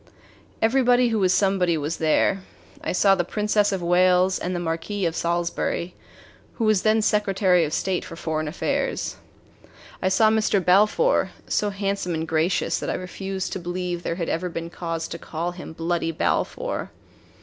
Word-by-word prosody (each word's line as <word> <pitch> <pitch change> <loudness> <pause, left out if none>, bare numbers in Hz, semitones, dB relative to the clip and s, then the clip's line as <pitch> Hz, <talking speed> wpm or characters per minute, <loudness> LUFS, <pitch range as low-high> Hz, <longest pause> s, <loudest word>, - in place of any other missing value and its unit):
Everybody 245 +1 +4
who 225 -2 0
was 185 -2 +3
somebody 185 -3 +2
was 150 +2 -3
there. 160 +4 +2 0.4
I - - -1
saw 195 +1 +4
the 180 -2 +1
Princess 210 +2 +1
of 190 -3 -2
Wales 180 +1 +3
and 180 +1 -3
the - - -1
Marquis 175 +4 -2
of 165 -1 -1
Salisbury, 170 +1 -1 0.6
who 230 - -3
was 215 -3 +3
then 220 0 +3
Secretary 195 -4 +2
of 150 - -5
State 185 +3 -1
for - - -9
Foreign 155 -2 -2
Affairs. 155 - -2 0.8
I 185 - +2
saw 215 +3 +4
Mr. 215 -2 +2
Balfour, 210 - +3 0.2
so 210 - +1
handsome 195 -3 -2
and 160 +1 -3
gracious 160 +3 +1
that - - -4
I - - -1
refused 190 +1 -4
to - - -3
believe 175 0 -3
there 170 - -3
had 170 -2 -3
ever 180 +2 -1
been 165 0 -6
cause 165 -2 -4
to 170 - -7
call 165 +2 -4
him 175 -1 -9
"Bloody 165 +1 -1
Balfour." - - -1
180 Hz, 170 wpm, -24 LUFS, 170-200 Hz, 0.8 s, Everybody